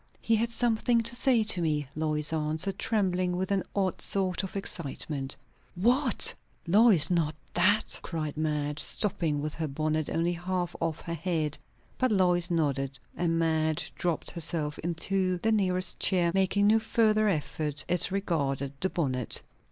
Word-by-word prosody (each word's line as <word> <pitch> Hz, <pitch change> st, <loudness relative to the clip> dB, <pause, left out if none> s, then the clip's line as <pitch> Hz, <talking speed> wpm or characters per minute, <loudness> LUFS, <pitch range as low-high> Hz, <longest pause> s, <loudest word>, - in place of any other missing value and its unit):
"He 230 Hz, -, +1 dB
had 230 Hz, +2 st, 0 dB
something 235 Hz, 0 st, +1 dB
to 235 Hz, +1 st, -1 dB
say 245 Hz, -3 st, +3 dB
to 210 Hz, -5 st, +3 dB
me," 150 Hz, -3 st, 0 dB
Lois 155 Hz, 0 st, 0 dB
answered, 160 Hz, +5 st, -1 dB
trembling 185 Hz, -4 st, 0 dB
with 190 Hz, +2 st, -2 dB
an 195 Hz, -1 st, +2 dB
odd 190 Hz, -3 st, -1 dB
sort 185 Hz, -2 st, 0 dB
of 190 Hz, -1 st, -7 dB
excitement. 145 Hz, -7 st, -3 dB, 0.4 s
"What? 240 Hz, +6 st, +3 dB, 0.3 s
Lois, 190 Hz, -3 st, +6 dB
not 160 Hz, -3 st, +1 dB, 0.2 s
that?" 205 Hz, +5 st, +2 dB
cried 155 Hz, -4 st, -4 dB
Madge, 150 Hz, -1 st, -2 dB
stopping 160 Hz, -8 st, 0 dB
with 155 Hz, 0 st, -3 dB
her 160 Hz, -2 st, -3 dB
bonnet 155 Hz, +2 st, -1 dB
only 170 Hz, +1 st, 0 dB
half 175 Hz, 0 st, -3 dB
off 160 Hz, -1 st, -2 dB
her 170 Hz, -, -5 dB
head. 160 Hz, -3 st, -1 dB, 0.4 s
But 255 Hz, -2 st, +2 dB
Lois 180 Hz, -3 st, +2 dB
nodded; 140 Hz, -5 st, -1 dB, 0.2 s
and 165 Hz, -1 st, 0 dB
Madge 160 Hz, -1 st, 0 dB
dropped 170 Hz, -3 st, -2 dB
herself 155 Hz, -3 st, -2 dB
into 185 Hz, +2 st, -1 dB
the 220 Hz, +6 st, 0 dB
nearest 185 Hz, -4 st, 0 dB
chair, 175 Hz, -3 st, +3 dB
making 195 Hz, +1 st, +2 dB
no 220 Hz, +2 st, +5 dB
further 215 Hz, -1 st, +2 dB
effort 150 Hz, -4 st, -2 dB
as 180 Hz, +2 st, +1 dB
regarded 140 Hz, -8 st, -1 dB
the 190 Hz, -, +1 dB
bonnet. 130 Hz, -9 st, -1 dB
175 Hz, 150 wpm, -28 LUFS, 155-195 Hz, 0.4 s, Lois